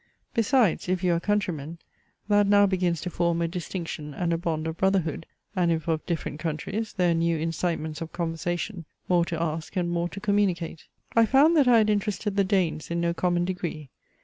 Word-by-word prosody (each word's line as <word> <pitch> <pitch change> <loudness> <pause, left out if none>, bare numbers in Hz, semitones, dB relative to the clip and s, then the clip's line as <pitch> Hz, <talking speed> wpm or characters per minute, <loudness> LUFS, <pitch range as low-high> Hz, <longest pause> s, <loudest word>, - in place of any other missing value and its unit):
Besides, 230 - +2
if 185 0 0
you 180 -1 +3
are 170 - +1
countrymen, 170 -6 -2 0.5
that 205 -1 +4
now 205 0 +6
begins 180 -4 0
to 180 - -4
form 170 -1 +1
a 170 - +1
distinction 165 -4 -5
and 170 -1 0
a - - +1
bond 160 -2 -2
of 160 0 -3
brotherhood; 185 -5 0 0.3
and 175 -2 +2
if 160 -1 -1
of 160 -1 0
different 160 -3 -3
countries, 170 +8 -3
there 180 -2 +2
are - - +3
new 165 0 +1
incitements 165 -1 -2
of 165 - -5
conversation, 175 +2 -3 0.2
more 175 -2 +3
to 170 -2 -3
ask 160 -1 -3
and 175 -2 0
more 170 0 -1
to 200 - -7
communicate. 195 -6 0 0.3
I 230 -1 +5
found 285 +7 +5
that 290 -5 +5
I 240 -2 +7
had 215 -1 +4
interested 205 0 -1
the 200 - +3
Danes 185 -6 0
in 170 0 -1
no 170 0 +1
common 175 0 +1
degree. 170 -6 -4
175 Hz, 200 wpm, -26 LUFS, 165-195 Hz, 0.5 s, I